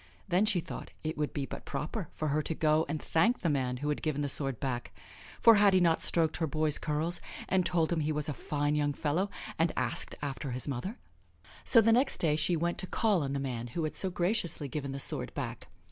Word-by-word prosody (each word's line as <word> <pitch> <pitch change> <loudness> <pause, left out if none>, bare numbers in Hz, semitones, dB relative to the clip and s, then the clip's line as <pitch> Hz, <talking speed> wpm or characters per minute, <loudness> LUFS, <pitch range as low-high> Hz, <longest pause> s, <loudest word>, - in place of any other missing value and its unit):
Then 190 +3 +3
she 190 -5 +3
thought - - -7
it 155 0 -2
would 150 -1 -1
be 140 -2 -3
but - - -8
proper 165 +4 -4
for 155 - -3
her 150 +2 +1
to 160 - -2
go 155 0 +2
and 155 0 -2
thank 220 +13 +2
the 170 - +1
man 130 -3 0
who 145 +3 -3
had 150 - -1
given 145 -2 -1
the 145 - -1
sword 135 -4 -3
back; 125 -3 -3 0.5
for 230 - +8
had 200 -2 +5
he - - +6
not 170 -2 +3
stroked 160 -2 +2
her 160 - 0
boy's 155 0 0
curls 155 +3 0 0.3
and 185 -1 +2
told 170 -1 +1
him 165 - 0
he 155 0 0
was 150 0 -2
a 150 - -2
fine 145 +2 -1
young 145 -1 +1
fellow, 160 +8 0 0.3
and 165 0 +3
asked - - 0
after 140 0 -4
his 125 +2 -1
mother! 145 - -4 0.7
So 230 - +8
the 225 +1 +4
next 260 +4 +3
day 155 -3 +2
she 160 +3 +2
went 170 +2 -1
to 185 - -1
call 210 -4 +2
on 140 -1 -2
the 140 - -1
man 125 -3 -3
who 165 - 0
had 155 - -3
so 190 - +1
graciously 175 -4 0
given 140 0 -4
the 135 - -4
sword 140 - -3
back. - - -5
155 Hz, 240 wpm, -31 LUFS, 145-175 Hz, 0.7 s, for